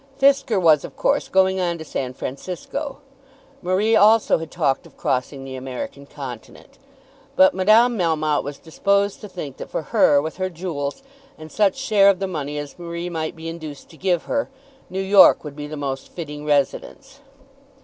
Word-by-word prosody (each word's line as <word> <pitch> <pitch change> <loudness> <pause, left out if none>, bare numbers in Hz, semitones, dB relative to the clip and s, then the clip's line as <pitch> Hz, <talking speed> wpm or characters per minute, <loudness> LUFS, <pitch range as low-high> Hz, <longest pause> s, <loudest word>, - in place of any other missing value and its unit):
Fisker 275 -6 +3
was, 160 -5 +4
of - - -9
course, - - +1
going 190 0 +3
on 175 -2 -1
to 160 - -8
San 130 -3 -4
Francisco. 185 - -5 0.6
Marie 195 +5 +2
also 220 -3 +5
had 165 -1 -7
talked 145 -6 -1
of - - -23
crossing 135 +1 -2
the 135 -1 -7
American 130 +2 -7
continent. 130 -6 -10 0.6
But 190 0 +6
Madame 220 +5 +4
Melmotte 155 -3 +1
was 145 0 -6
disposed 200 +5 0
to 210 - -9
think 145 -8 -7
that - - -8
for - - -3
her, 145 - +5
with 160 +4 -4
her 185 0 -1
jewels, 165 - -5 0.3
and 155 0 -11
such 205 -3 +2
share 215 -7 +4
of 195 - +3
the 195 - -2
money 150 -5 -4
as 145 +2 -7
Marie 170 +1 -5
might 160 0 -3
be 165 0 -8
induced 160 -4 -8
to - - -15
give 180 -2 0
her, 285 - -2 0.4
New 190 +1 -3
York 195 0 +6
would 150 -2 -8
be 150 0 -6
the 155 0 -7
most 135 -2 -4
fitting 150 -3 -7
residence. 150 - -1
170 Hz, 180 wpm, -22 LUFS, 145-195 Hz, 0.6 s, But